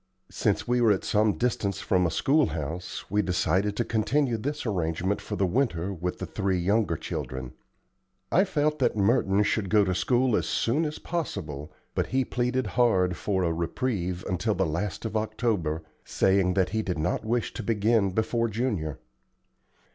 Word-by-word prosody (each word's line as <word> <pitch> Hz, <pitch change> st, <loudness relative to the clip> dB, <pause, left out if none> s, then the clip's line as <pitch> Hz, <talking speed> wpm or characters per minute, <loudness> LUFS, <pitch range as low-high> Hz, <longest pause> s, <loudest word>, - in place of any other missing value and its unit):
Since -, -, 0 dB
we 125 Hz, 0 st, +2 dB
were 115 Hz, -3 st, +5 dB
at 95 Hz, -, +1 dB
some 105 Hz, 0 st, +2 dB
distance 100 Hz, -4 st, -1 dB
from 90 Hz, -5 st, +2 dB
a -, -, -1 dB
schoolhouse 85 Hz, -, 0 dB
we 105 Hz, +1 st, +3 dB
decided 95 Hz, +2 st, 0 dB
to 120 Hz, -, +1 dB
continue 120 Hz, +3 st, +1 dB
this 145 Hz, +6 st, -3 dB
arrangement 90 Hz, -1 st, -1 dB
for 105 Hz, -, -5 dB
the 100 Hz, -, +1 dB
winter 100 Hz, -4 st, 0 dB
with 90 Hz, 0 st, -3 dB
the 95 Hz, -, -4 dB
three 95 Hz, +1 st, -1 dB
younger 95 Hz, -1 st, +1 dB
children. 65 Hz, -3 st, -5 dB, 0.8 s
I 190 Hz, -, +4 dB
felt 150 Hz, -4 st, 0 dB
that 120 Hz, -4 st, +2 dB
Merton 100 Hz, -1 st, +3 dB
should 105 Hz, -1 st, 0 dB
go 105 Hz, 0 st, +4 dB
to 95 Hz, -, 0 dB
school 125 Hz, +5 st, +2 dB
as -, -, 0 dB
soon 145 Hz, +8 st, +1 dB
as 150 Hz, 0 st, -3 dB
possible, 80 Hz, -, -4 dB, 0.2 s
but -, -, 0 dB
he 130 Hz, 0 st, +1 dB
pleaded 125 Hz, +2 st, 0 dB
hard 95 Hz, -8 st, +2 dB
for 95 Hz, -1 st, -1 dB
a 85 Hz, -2 st, +1 dB
reprieve 90 Hz, 0 st, -2 dB
until 100 Hz, +4 st, 0 dB
the 95 Hz, +1 st, +1 dB
last 90 Hz, +6 st, -3 dB
of 110 Hz, -, -4 dB
October, 110 Hz, -8 st, -1 dB, 0.2 s
saying 95 Hz, -1 st, +2 dB
that 95 Hz, -2 st, +2 dB
he 110 Hz, +2 st, 0 dB
did 90 Hz, -5 st, -3 dB
not 80 Hz, -, -1 dB
wish 115 Hz, +2 st, -1 dB
to -, -, -5 dB
begin 110 Hz, -1 st, +2 dB
before 110 Hz, +4 st, 0 dB
Junior. 105 Hz, -, -2 dB
105 Hz, 170 wpm, -27 LUFS, 90-120 Hz, 0.8 s, were